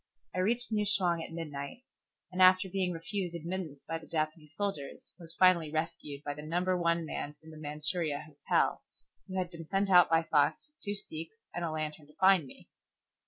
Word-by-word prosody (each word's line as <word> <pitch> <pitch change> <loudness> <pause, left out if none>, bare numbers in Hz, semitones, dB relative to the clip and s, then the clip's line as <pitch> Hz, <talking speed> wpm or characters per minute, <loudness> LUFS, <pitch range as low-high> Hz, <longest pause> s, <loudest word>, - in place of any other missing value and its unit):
I 185 - -2
reached 235 +5 +2
New 210 -1 +2
Chwang 180 -5 +2
at - - -8
midnight, 155 - -6 0.5
and 185 +1 -1
after 185 +1 +7
being 185 -1 0
refused 175 +1 -3
admittance 170 -4 -5
by 165 0 -2
the 160 - -14
Japanese 155 -1 -2
soldiers, 165 -8 -4
was 165 -1 -6
finally 175 -4 +5
rescued 155 -2 -4
by 145 - -3
the 150 - -8
Number 175 +4 0
One 170 -1 +1
man 150 -1 -4
from 160 0 -14
the 155 - -11
Manchuria 150 +1 0
Hotel, 150 -2 0 0.5
who 190 - -5
had 180 -1 -1
been 165 -1 -8
sent 195 +3 0
out 180 -1 +8
by 165 0 +4
Fox 150 -3 +2
with 300 0 -36
two 205 -1 -1
sikhs 160 -1 -6 0.2
and 175 - -3
a 170 - 0
lantern 155 -1 -4
to 150 - -20
find 190 -6 +5
me. - - -11
165 Hz, 195 wpm, -31 LUFS, 155-185 Hz, 0.5 s, out